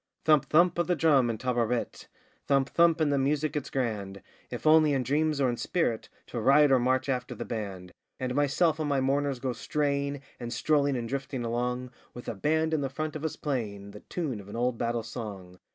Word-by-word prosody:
Thump! 155 -3 +5
thump! 175 +2 +4
of 175 - +1
the 180 - +2
drum 140 -6 +4
and 110 -2 -3
'Ta 125 - -1
ra 120 -1 +1
rit,' 115 +1 -2 0.4
Thump! 135 -1 +2
thump! 170 -1 +4
and 150 -2 +2
the 140 - +2
music 145 +3 0
it's 150 - -3
grand, 105 -7 -3 0.3
If 120 -2 -7
only 155 -1 +6
in 135 -2 +1
dreams, 150 +3 +1
or 135 - +3
in 120 -1 -1
spirit, 120 -9 -1 0.2
To 120 - -5
ride 140 +4 +5
or 130 - +5
march 130 +2 +1
after 125 -2 -2
the - - -6
band! 95 -5 -5 0.3
And 130 -1 -2
myself 145 +4 +2
and 155 -1 -1
my 140 -1 +2
mourners 140 +1 0
go 125 0 -2
straying, 140 0 -1 0.2
And 120 -1 -5
strolling 140 +2 +1
and 120 -1 -3
drifting 135 -1 -4
along 125 +2 -2 0.2
With 120 - -9
a - - -2
band 160 +8 0
in 155 - +1
the 135 - -1
front 155 +3 -4
of 155 - -5
us 160 - -2
playing 105 -8 -4
The 105 - -10
tune 145 -8 -4
of 100 0 -12
an - - -8
old 120 0 0
battle 115 -1 -1
song! 100 -6 -8
135 Hz, 220 wpm, -28 LUFS, 120-150 Hz, 0.4 s, only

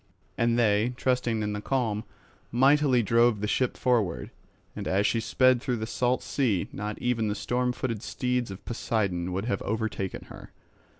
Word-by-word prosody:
And 115 0 +2
they, 110 +1 +2
trusting 125 -4 0
in 105 0 -2
the 105 - -4
calm, 110 -4 -1 0.5
mightily 135 0 +4
drove 115 +1 +3
the 105 - -2
ship 130 +3 0
forward; 115 -9 0 0.4
and - - -5
as 100 +2 +2
she 115 - +2
sped 130 +2 +3
through 125 -2 -1
the 110 - -3
salt 125 +2 0
sea, 115 -10 0
not 105 +1 -4
even 120 -3 0
the 105 - -1
storm 125 +4 0
footed 115 -4 -3
steeds 125 -1 -1
of 95 -1 -9
Poseidon 100 -7 -1
would 95 +3 -2
have 100 -5 -1
overtaken 110 -3 -3
her. - - -11
115 Hz, 170 wpm, -27 LUFS, 105-125 Hz, 0.5 s, mightily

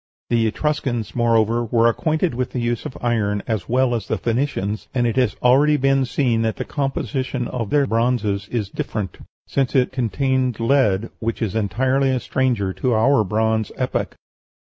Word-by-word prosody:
The 115 -1 +3
Etruscans, 125 -2 -2
moreover, 115 -1 +2
were 115 0 +2
acquainted 160 +7 0
with 125 +1 -3
the 125 - -2
use 120 -1 -2
of - - -10
iron 105 -4 0
as 110 -6 -3
well 125 +1 +2
as 115 -4 -3
the - - -1
Phoenicians, 115 -4 -2
and 120 -2 +2
it 115 -1 0
has 125 -4 +1
already 140 +4 +5
been 135 -1 +2
seen 120 -3 +1
that 110 -1 0
the - - -4
composition 135 -3 -2
of 115 -5 -4
their 145 -1 +3
bronzes 115 -4 0
is 110 -2 -2
different, 100 -5 -4 0.3
since 135 -1 -1
it 130 -2 +3
contains 130 -1 0
lead, 115 -4 +2
which 115 +1 -2
is 110 -5 -2
entirely 130 +6 +1
a 130 -1 +1
stranger 120 -8 0
to 125 +2 0
our 115 +2 +4
bronze 110 +2 0
epoch.... 130 -1 -2
120 Hz, 170 wpm, -21 LUFS, 110-130 Hz, 0.3 s, already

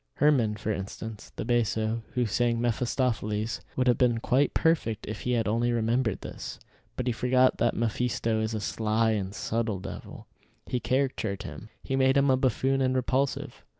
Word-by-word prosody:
Hermann, 130 -8 +3
for 105 +1 -3
instance, 105 +2 -6
the - - -4
basso, 115 -1 +1
who 125 -1 +2
sang 115 +2 +1
Mephistopheles, 115 -2 -1
would 130 - +1
have 125 -2 +3
been 120 -2 +3
quite 130 +5 +2
perfect 155 -10 +1
if 110 -1 -5
he 125 - 0
had 115 -2 +1
only 115 +3 +1
remembered 115 -1 0
this. - - -7 0.4
But 125 - -3
he 125 - +1
forgot 125 +2 +3
that 120 - +2
Mephisto 115 -1 0
is 110 0 -1
a 110 - -3
sly 110 +2 +1
and 100 -3 -1
subtle 110 -1 -2
devil. - - -8 0.4
He 125 - -1
caricatured 110 -4 -1
him. 110 - -9
He 135 - -2
made 135 +1 +4
him 140 -1 +4
a - - +5
buffoon 135 +1 +1
and 130 0 +2
repulsive. 130 +2 -1
115 Hz, 175 wpm, -28 LUFS, 110-130 Hz, 0.4 s, a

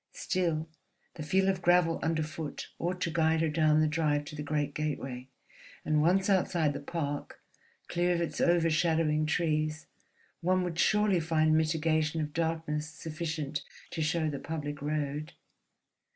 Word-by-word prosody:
Still, 165 -4 -1 0.5
the - - -8
feel 190 +6 +2
of 190 -2 +1
gravel 175 -1 +3
underfoot 155 -1 -3
ought 180 +2 -2
to 170 - 0
guide 160 0 +2
her 165 - +2
down 155 0 +3
the 155 - +3
drive 150 -2 +1
to 150 - -8
the 150 - -5
great 145 -1 -1
gateway; 135 -4 -4 0.6
and 155 -1 +2
once 185 +4 +3
outside 175 -6 +2
the 140 - -4
park, 145 -1 -4 0.5
clear 175 0 +1
of - - -1
its 170 - -2
overshadowing 160 -2 +2
trees, 155 -1 0 0.5
one 185 +1 +2
would 175 -1 -3
surely 210 -3 +3
find 155 -1 +2
mitigation 155 0 +1
of 150 -1 -3
darkness 160 -2 -1
sufficient 155 -2 -4 0.3
to 160 - -3
show 160 +1 +1
the 145 -2 -3
public 145 -2 -5
road. 150 0 -2
155 Hz, 150 wpm, -30 LUFS, 150-170 Hz, 0.6 s, gravel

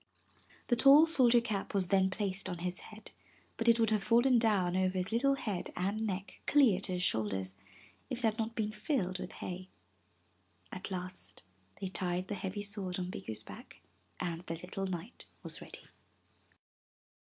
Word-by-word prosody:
The 240 - +4
tall 275 +6 +8
soldier 245 -7 +5
cap 210 -4 -3
was 185 -3 +2
then 190 0 +4
placed 195 0 -3
on 175 - -3
his 180 0 -3
head, 215 0 -12 0.4
but 230 - -1
it 230 0 +5
would 225 -1 +3
have 210 -2 +1
fallen 240 +2 +5
down 195 -6 +2
over 185 0 +1
his 185 +3 -2
little 275 +5 +3
head 210 -9 -3
and 205 +5 -1
neck 195 0 -5
clear 255 -11 +5
to 190 -1 -3
his 180 0 -1
shoulders, 95 - -1 0.5
if 255 - -2
it 245 - -8
had 220 0 +1
not 225 +1 -2
been 215 -1 -1
filled 210 - -1
with - - -6
hay. 185 +1 -6 1.0
At 185 - -6
last 180 - -7 0.4
they 195 - -3
tied 185 0 -2
the - - -1
heavy 200 +1 -4
sword 200 -3 -3
on 180 -1 -3
Bikku's 110 -10 -5
back - - -12 0.4
and 170 -2 -3
the 165 - -2
little 185 +3 -5
knight 185 +5 -6 0.2
was - - -3
ready. - - -9
195 Hz, 175 wpm, -33 LUFS, 180-225 Hz, 1.0 s, tall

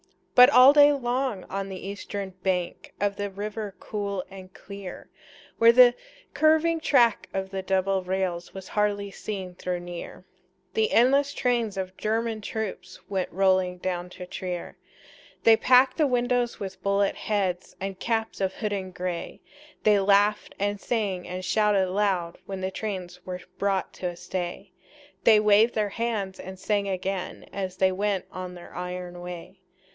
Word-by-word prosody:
But 250 +1 +9
all 260 0 +8
day 290 0 +7
long 250 -6 -1
on 195 0 -4
the 190 -1 -7
eastern 200 -1 -5
bank 180 -2 -2
Of 200 0 0
the 205 0 -2
river 205 +1 -5
cool 200 -3 -3
and 190 -1 -11
clear, 200 -1 -10 0.5
Where 230 0 +8
the 245 0 +7 0.4
curving 315 +3 +3
track 240 -8 +3
of 190 0 -3
the 195 -1 -3
double 190 0 +1
rails 180 -2 -2
Was 190 -1 -9
hardly 205 -1 0
seen 190 -3 -6
though 180 -1 -1
near, 175 -1 -8 0.5
The 445 0 +1
endless 275 +4 +4
trains 235 -5 0
of 185 0 -4
German 220 0 -1
troops 220 -1 -5
Went 190 -2 -2
rolling 185 -1 +2
down 180 -1 -3
to 180 - -8
Trier. 180 -1 -5 0.7
They 225 - +8
packed 255 +3 +4
the 305 -3 +3
windows 245 -1 0
with 190 -1 -6
bullet 200 +1 +2
heads 190 -4 -2
And 195 -1 -5
caps 225 -2 -2
of 190 0 0
hodden 205 -4 -3
gray; 180 -1 -5 0.4
They 210 -1 +5
laughed 205 +1 +2
and 205 0 -1
sang 200 -6 -2
and 185 +1 -5
shouted 195 -1 +2
loud 190 -4 0
When 195 -1 -5
the 190 0 -2
trains 185 -4 -5
were 180 -1 -6 0.2
brought 195 -1 0
to 180 - -3
a 175 - -4
stay; 175 0 -5 0.5
They 220 -2 +7
waved 210 +2 +4
their 210 -1 +1
hands 205 -4 -3
and 190 0 -8
sang 200 +1 0
again 190 0 -3
As 190 -2 -4
they 190 0 +3
went 195 0 -1
on 185 -1 -6
their 175 - -12
iron 180 0 -5
way. 180 +1 -8
195 Hz, 160 wpm, -26 LUFS, 185-220 Hz, 0.7 s, But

